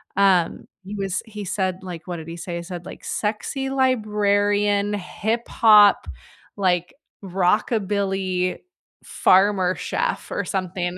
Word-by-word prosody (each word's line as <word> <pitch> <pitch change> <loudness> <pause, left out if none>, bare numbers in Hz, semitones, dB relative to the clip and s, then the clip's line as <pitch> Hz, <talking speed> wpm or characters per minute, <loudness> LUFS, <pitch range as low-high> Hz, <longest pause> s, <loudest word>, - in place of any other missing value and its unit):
Um, 190 -3 +2 0.2
he 205 +2 -6
was 195 -1 -2
he 210 -2 -8
said 185 -1 -2
like, 175 -3 -8
what 180 - -4
did 160 -1 -9
he 165 - -7
say? 175 0 -6
He 170 - -6
said 175 0 -8
like - - -10
sexy 230 +6 -3
librarian, 205 -5 +1
hip-hop, 210 - +3 0.5
like, 180 -3 0 0.3
rockabilly 195 -1 0 0.4
farmer 185 -1 +3
chef - - -2
or - - -2
something. 180 -2 -3
195 Hz, 120 wpm, -22 LUFS, 180-210 Hz, 0.5 s, hip-hop